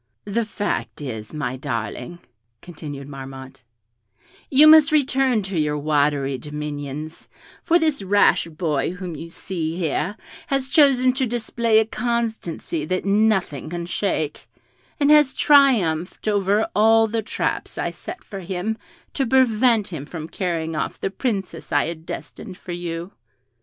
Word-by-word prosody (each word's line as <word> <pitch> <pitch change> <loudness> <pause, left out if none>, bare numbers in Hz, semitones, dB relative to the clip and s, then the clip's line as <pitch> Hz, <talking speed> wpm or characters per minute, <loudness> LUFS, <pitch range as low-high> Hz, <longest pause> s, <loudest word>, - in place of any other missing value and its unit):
"The 225 +3 -1
fact 205 -1 -3
is, 110 -7 -6
my 130 -5 -3
darling," 125 +3 -4 0.5
continued 145 -5 -8
Marmotte, 135 -1 -9 0.9
"you 285 +3 +6
must 310 0 +8
return 265 -6 +2
to 190 -3 -2
your 150 -1 0
watery 145 -2 +1
dominions, 150 +1 -6 0.3
for 345 0 +3
this 310 -7 +1
rash 195 -3 +3
boy 155 -2 -1
whom 180 -2 -6
you 165 +3 -8
see 165 -2 -4
here 180 +4 -1 0.3
has 275 -1 -1
chosen 260 -4 +5
to 260 -1 0
display 230 -1 +1
a 220 - +5
constancy 225 -9 -2
that 185 +4 -2
nothing 195 - +1
can 170 0 -4
shake, 160 - -2 0.5
and 285 +1 +4
has 300 -3 +5
triumphed 215 - +3
over 205 +1 +2
all 225 +2 +5
the 225 +1 -1
traps 215 - -3
I - - -1
set 365 - -9
for 195 - -8
him 190 +4 -3 0.3
to 275 - 0
prevent 235 -3 +3
him 150 -5 -6
from 160 -1 -7
carrying 165 -4 -2
off 155 - -3
the 195 - -2
Princess 195 -6 -3
I - - +3
had 165 0 -7
destined 190 -5 -7
for 180 - -9
you." 175 +1 -5
185 Hz, 140 wpm, -22 LUFS, 155-230 Hz, 0.9 s, must